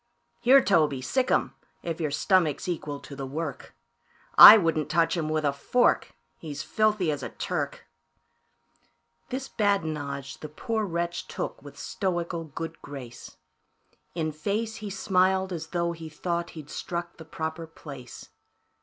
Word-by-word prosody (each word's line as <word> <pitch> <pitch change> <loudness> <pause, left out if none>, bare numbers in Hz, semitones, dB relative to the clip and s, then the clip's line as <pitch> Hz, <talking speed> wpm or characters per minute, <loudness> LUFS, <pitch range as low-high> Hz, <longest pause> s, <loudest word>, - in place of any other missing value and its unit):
"Here, 265 +2 +6
Toby, 155 -8 +3
sic 255 - 0
'em, - - +1 0.3
if 170 -1 -4
your 155 - 0
stomach's 155 +1 +1
equal 150 -5 -3
to 140 - -10
the 135 -1 -5
work 150 +2 -5 0.6
I 220 - +13
wouldn't 165 -5 0
touch 165 +1 +2
him 160 -3 -2
with 155 -1 0
a 140 - +2
fork, 245 - +1 0.2
he's 145 -3 -6
filthy 210 +1 +1
as 145 - -3
a - - -4
Turk." - - -4 1.4
This 270 +1 -4
badinage 155 - -1
the 155 - -7
poor 220 - -2
wretch 170 -1 -3
took - - -5
with - - -12
stoical 175 -3 -2
good 165 +2 -7
grace; 125 -5 -10 0.8
In 160 -2 -1
face, 210 +9 -2
he 215 -2 -6
smiled 190 -1 +1
as 160 -2 -5
tho' 170 -1 -1
he 165 -1 -8
thought 170 +2 -3
he'd 150 -2 -9
struck 175 -1 -5
the 160 - -9
proper 160 +1 -5
place. 140 -6 -11
165 Hz, 145 wpm, -27 LUFS, 150-190 Hz, 1.4 s, I